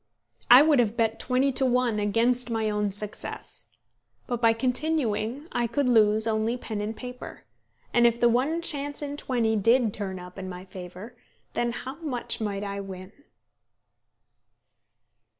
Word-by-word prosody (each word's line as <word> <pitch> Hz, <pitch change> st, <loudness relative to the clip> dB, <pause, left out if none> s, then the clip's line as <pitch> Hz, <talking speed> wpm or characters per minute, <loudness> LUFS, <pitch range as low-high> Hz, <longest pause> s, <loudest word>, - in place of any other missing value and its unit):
I 250 Hz, +4 st, +10 dB
would 300 Hz, -4 st, +4 dB
have 230 Hz, -1 st, +1 dB
bet 225 Hz, -1 st, +1 dB
twenty 255 Hz, +3 st, +1 dB
to 265 Hz, -, +1 dB
one 250 Hz, -4 st, +1 dB
against 235 Hz, +4 st, +2 dB
my 220 Hz, -2 st, -1 dB
own 210 Hz, 0 st, 0 dB
success. 205 Hz, +1 st, -4 dB, 0.6 s
But 245 Hz, -2 st, -3 dB
by 230 Hz, -1 st, +5 dB
continuing 255 Hz, +1 st, -1 dB
I 240 Hz, -, 0 dB
could 260 Hz, +4 st, 0 dB
lose 220 Hz, -2 st, +4 dB
only 225 Hz, +2 st, 0 dB
pen 220 Hz, -4 st, -4 dB
and 215 Hz, +2 st, -4 dB
paper; 250 Hz, 0 st, -9 dB, 0.5 s
and 240 Hz, 0 st, +5 dB
if 235 Hz, 0 st, 0 dB
the 240 Hz, -, +5 dB
one 275 Hz, +8 st, +1 dB
chance 290 Hz, -2 st, -1 dB
in 285 Hz, 0 st, -4 dB
twenty 235 Hz, -6 st, 0 dB
did 230 Hz, +1 st, +3 dB
turn 195 Hz, -3 st, -3 dB
up 180 Hz, +1 st, -10 dB
in 185 Hz, -1 st, -6 dB
my 180 Hz, 0 st, -8 dB
favour, 185 Hz, +5 st, -10 dB, 0.4 s
then 240 Hz, 0 st, 0 dB
how 260 Hz, +4 st, -7 dB
much 275 Hz, -9 st, -3 dB
might 205 Hz, -2 st, -2 dB
I 200 Hz, 0 st, -4 dB
win! 190 Hz, -1 st, -8 dB
230 Hz, 155 wpm, -26 LUFS, 210-250 Hz, 0.6 s, I